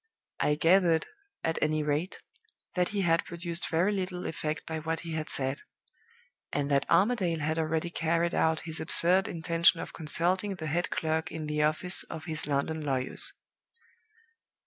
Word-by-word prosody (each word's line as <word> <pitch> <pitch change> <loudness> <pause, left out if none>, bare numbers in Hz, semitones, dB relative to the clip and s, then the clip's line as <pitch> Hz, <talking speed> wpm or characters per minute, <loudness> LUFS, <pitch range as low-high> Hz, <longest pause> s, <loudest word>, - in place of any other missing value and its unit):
I 150 - +2
gathered, 165 +1 +3 0.4
at 160 0 -1
any 155 0 +1
rate, 150 +5 -2 0.5
that 180 -1 +1
he 200 -1 -2
had 165 -2 +2
produced 170 0 -4
very 170 +5 +2
little 185 -2 -3
effect 155 0 -3
by 160 -1 -4
what 160 +1 -3
he 170 - -7
had 155 -1 -3
said; 135 0 -1 0.9
and 145 0 -1
that 140 -1 +1
Armadale 185 -1 +2
had 155 +2 -1
already 160 +1 -1
carried 170 +1 0
out 160 0 +1
his 160 -1 -4
absurd 180 +4 +5
intention 165 -2 +2
of - - -7
consulting 180 +6 +1
the 160 -3 -7
head 170 +4 -1
clerk 160 +2 -1
in 160 -1 -5
the 150 0 -1
office 155 +5 +1
of 160 0 -8
his 155 -3 -3
London 150 +2 -1
lawyers. 140 - +1
165 Hz, 160 wpm, -29 LUFS, 155-175 Hz, 0.9 s, absurd